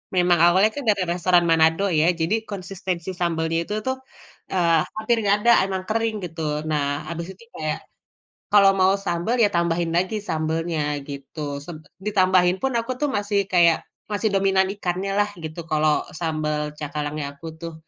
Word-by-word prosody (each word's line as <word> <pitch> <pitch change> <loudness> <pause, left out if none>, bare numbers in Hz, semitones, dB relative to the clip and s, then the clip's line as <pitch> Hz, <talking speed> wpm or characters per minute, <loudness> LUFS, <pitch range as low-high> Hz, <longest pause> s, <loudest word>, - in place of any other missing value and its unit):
memang 175 -1 +4
awalnya 190 +5 +5 0.2
dari 200 -3 +2
restoran 175 0 +3
Manado 165 +4 +3
ya, 160 -2 +3
jadi 170 +5 0
konsistensi 190 -3 -5
sambalnya 165 -1 0
itu 210 - -5
tuh, 260 0 0 0.6
eee, 170 -3 +3 0.2
hampir 220 +2 +1
nggak 200 0 +5
ada 235 +2 +5
emang 190 -1 -3
kering 225 0 0
gitu. 165 -1 -7 0.3
Nah 150 -2 +1 0.3
habis 170 0 -5
itu 190 - -18
kayak 155 -1 -2 0.7
kalau 200 -1 +7
mau 190 0 +4
sambal 185 +5 -1
ya 230 - +6
tambahin 170 0 +1
lagi 185 +5 +1
sambelnya 160 +1 -1 0.3
gitu. 140 +2 -8 0.2
Seb 170 +1 -8 0.3
ditambahin 185 -3 +3
pun 265 - 0
aku 230 +2 -2
tuh 295 - +2
masih 205 0 0
kayak 170 -2 +4 0.2
masih 210 +1 -1
dominan 195 -1 +3
ikannya 190 0 -2
lah 205 0 +3
gitu 160 0 -6
kalau 155 0 +2 0.2
sambal 155 -2 -1 0.2
cakalangnya 150 0 -3
aku 165 - -10
tuh, 165 -1 -6
175 Hz, 160 wpm, -23 LUFS, 165-195 Hz, 0.7 s, kalau